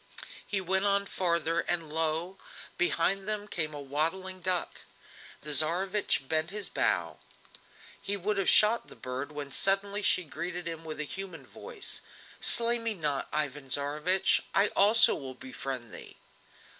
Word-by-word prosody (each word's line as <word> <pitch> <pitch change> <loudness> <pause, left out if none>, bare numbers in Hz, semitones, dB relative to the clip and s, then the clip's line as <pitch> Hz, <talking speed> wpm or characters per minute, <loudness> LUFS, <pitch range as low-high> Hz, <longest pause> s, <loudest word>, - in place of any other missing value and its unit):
He 200 - -1
went 190 +1 0
on 200 0 +2
farther, 170 -3 0
and 165 -4 -2
lo! 165 +4 -1 0.4
behind 185 +3 +1
them 210 -1 -2
came 155 -6 -1
waddling 160 +7 -3
a - - -20
duck. 180 0 -2 0.6
The 150 - -1
Tsarevich 170 -2 +2
bent 155 +2 0
his 205 +1 -3
bow; - - -1 0.8
he 200 0 -2
would 200 +2 -1
have 195 - +2
shot 220 +2 +5
the - - -12
bird, 130 +4 -6
when 145 -2 -7
suddenly 200 +5 +1
she 185 -2 +3
greeted 170 +2 -5
him 165 -1 -6
with 155 -1 -7
a - - -1
human 170 -3 -7
voice: 470 - -2 0.4
"Slay 235 0 +4
me 230 -1 -2
not, 150 -6 -1
Ivan 145 -2 -3
Tsarevich! 150 +7 +1
I 200 +2 +4
also 215 +3 +6
will 130 -2 -7
befriend 130 -2 -7
thee!" - - -11
175 Hz, 150 wpm, -29 LUFS, 150-195 Hz, 0.8 s, also